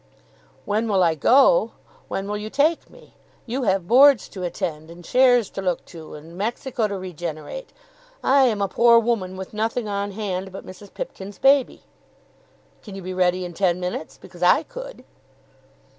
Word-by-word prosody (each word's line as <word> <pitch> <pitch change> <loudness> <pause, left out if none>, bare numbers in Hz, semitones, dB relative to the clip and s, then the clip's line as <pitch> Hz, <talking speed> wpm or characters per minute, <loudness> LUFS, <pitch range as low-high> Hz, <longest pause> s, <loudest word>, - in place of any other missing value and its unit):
"When 215 +2 0
will 195 -4 +2
I 165 -2 +3
go? 280 - +4 0.3
when 195 +1 -4
will 210 0 -3
you 215 +1 -6
take 300 +6 +1
me? - - -18 0.3
You 250 +3 -3
have 190 -3 0
Boards 265 +2 +6
to 190 - -9
attend, 160 -3 -4
and 170 +1 -12
shares 245 -2 +4
to - - -5
look 180 -2 -2
to, 160 -2 -10
and 160 +3 -12
Mexico 230 +3 -2
to 200 -1 -4
regenerate. 175 - -7 0.5
I 270 0 +5
am 215 -5 +1
a - - +1
poor 235 +4 +5
woman 215 -5 0
with 190 +2 -8
nothing 220 +2 -2
on 200 0 -3
hand 190 -2 -4
but 195 - -9
Mrs. 190 +2 -12
Pipkin's 200 - -8
baby. 270 -1 +3 1.0
Can 205 -3 -10
you 195 - -8
be 185 +1 -5
ready 180 0 +1
in 175 - -7
ten 180 -1 +1
minutes? 180 -3 -5
because 175 - -15
I 180 - +4
could." - - -10
200 Hz, 175 wpm, -23 LUFS, 180-240 Hz, 1.0 s, Boards